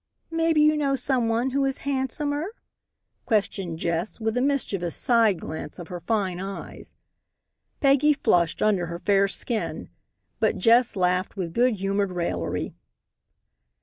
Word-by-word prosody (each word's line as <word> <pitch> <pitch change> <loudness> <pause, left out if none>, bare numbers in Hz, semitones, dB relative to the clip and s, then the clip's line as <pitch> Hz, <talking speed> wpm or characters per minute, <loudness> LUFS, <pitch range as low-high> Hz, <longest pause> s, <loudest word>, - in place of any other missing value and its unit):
"Maybe 325 -1 +2
you 305 0 +5
know 280 -2 +1
some 250 -2 0
one 235 +3 0
who 275 +1 +1
is 270 0 0
handsomer?" 290 - -2 0.7
questioned 195 -6 0
Jess 170 +6 -2
with 220 0 -1
a 250 - +1
mischievous 215 - -1
side 230 -7 +3
glance 155 -2 -6
of 175 -3 -9
her 180 - -5
fine 185 -1 -1
eyes. 195 +1 -8 0.9
Peggy 280 +1 +5
flushed 170 - +1
under 200 -5 +2
her 170 +1 -5
fair 200 +2 +2
skin. 220 +2 -3 0.5
But - - +1
Jess 235 0 +4
laughed 180 +1 0
with 170 -3 -3
good 245 +2 +3
humored 195 0 -1
raillery. 170 - -2
220 Hz, 140 wpm, -25 LUFS, 180-270 Hz, 0.9 s, you